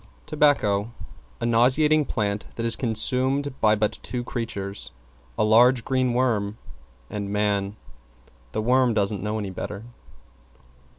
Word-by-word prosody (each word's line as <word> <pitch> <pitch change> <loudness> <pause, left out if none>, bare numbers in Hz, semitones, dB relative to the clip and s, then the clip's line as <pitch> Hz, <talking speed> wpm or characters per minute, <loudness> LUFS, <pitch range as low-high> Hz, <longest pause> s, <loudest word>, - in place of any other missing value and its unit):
=TOBACCO= 130 -9 +2 0.5
A - - -1
nauseating 135 +6 +3
plant 105 -4 -2
that 115 - -3
is 115 - +2
consumed 130 +4 0
by 110 -1 +4
but 105 0 -1
two 125 -1 -4
creatures; 100 -5 -5 0.5
a - - +2
large, 115 +3 +5
green 130 -2 0
worm 110 -5 0 0.5
and 100 -1 -4
man. 100 -1 0 0.8
The 110 - -1
worm 125 0 +3
doesn't 100 -1 0
know 105 +2 -2
any 100 -3 -4
better. 100 +3 -6
115 Hz, 125 wpm, -24 LUFS, 105-130 Hz, 0.8 s, large